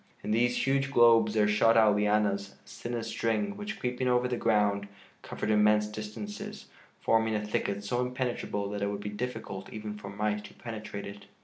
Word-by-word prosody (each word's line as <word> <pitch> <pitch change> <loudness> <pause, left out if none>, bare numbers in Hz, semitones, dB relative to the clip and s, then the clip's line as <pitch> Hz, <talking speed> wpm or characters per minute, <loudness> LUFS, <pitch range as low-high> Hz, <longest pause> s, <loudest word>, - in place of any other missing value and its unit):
In - - -2
these 120 +2 +2
huge 135 0 +1
globes 115 -4 +5
there 105 -1 +4
shot 115 +2 +4
out 110 -2 +6
lianas 105 -1 +1
as - - -12
thin 120 0 -3
as 115 -1 -3
string, 115 - -1
which, 205 +1 -6
creeping 125 +1 -1
over 125 0 +3
the 125 - -1
ground, 105 -3 +1 0.3
covered 105 - -3
immense 105 0 +4
distances, 205 - -7 0.3
forming 110 -1 +2
a 105 0 -2
thicket 100 -1 -2
so 120 +5 -1
impenetrable 125 -5 -2
that 105 -1 -4
it 100 - +1
would 100 0 -3
be 105 - -4
difficult 105 -4 -5
even 105 -1 -5
for 100 - -8
mice 105 +1 -1
to 105 - -13
penetrate 110 -3 -6
it. 100 0 -9
110 Hz, 190 wpm, -29 LUFS, 105-120 Hz, 0.3 s, out